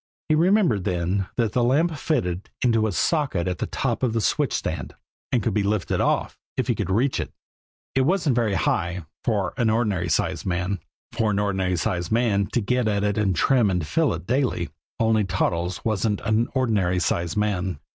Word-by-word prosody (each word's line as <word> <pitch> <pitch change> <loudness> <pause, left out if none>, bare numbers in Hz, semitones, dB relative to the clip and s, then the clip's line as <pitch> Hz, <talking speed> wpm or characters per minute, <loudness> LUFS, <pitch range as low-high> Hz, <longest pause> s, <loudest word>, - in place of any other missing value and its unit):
He - - +4
remembered 170 - +3
then 90 +1 -1
that 115 -4 +1
the 120 +2 +1
lamp 155 +7 +2
fitted 95 - -1
into 115 -3 +3
a - - -1
socket 130 - 0
at 90 -2 -2
the - - -2
top - - -2
of 125 -4 +1
the 115 - +1
switch - - +1
stand, - - -3 0.4
and 120 -5 +1
could 110 - 0
be 105 - +2
lifted 100 -1 0
off - - 0 0.2
if - - 0
he - - +3
could - - -3
reach 120 +8 +1
it! - - -4 0.6
It 135 - +3
wasn't 155 -2 +2
very 115 -5 +1
high 90 -2 -1 0.2
for 105 -5 0
an 115 -3 +2
ordinary 105 -6 0
sized 75 - 0
man 90 +2 -1 0.3
for 110 -2 0
an 105 - 0
ordinary 95 -3 0
sized 85 +1 -2
man 110 -4 +2
had - - -15
to 120 - +2
get 125 +3 +1
at 100 -1 +1
it 105 0 +2
to 105 -2 +1
trim 115 +6 +3
and 90 -4 0
fill 75 - +1
it - - -8
daily 125 - 0 0.3
only 110 -1 +3
Toddles 90 -1 -1
wasn't 110 -1 0
an 110 +2 +1
ordinary 105 -9 +1
sized 85 -1 -1
man. 95 -5 0
105 Hz, 195 wpm, -24 LUFS, 90-120 Hz, 0.6 s, He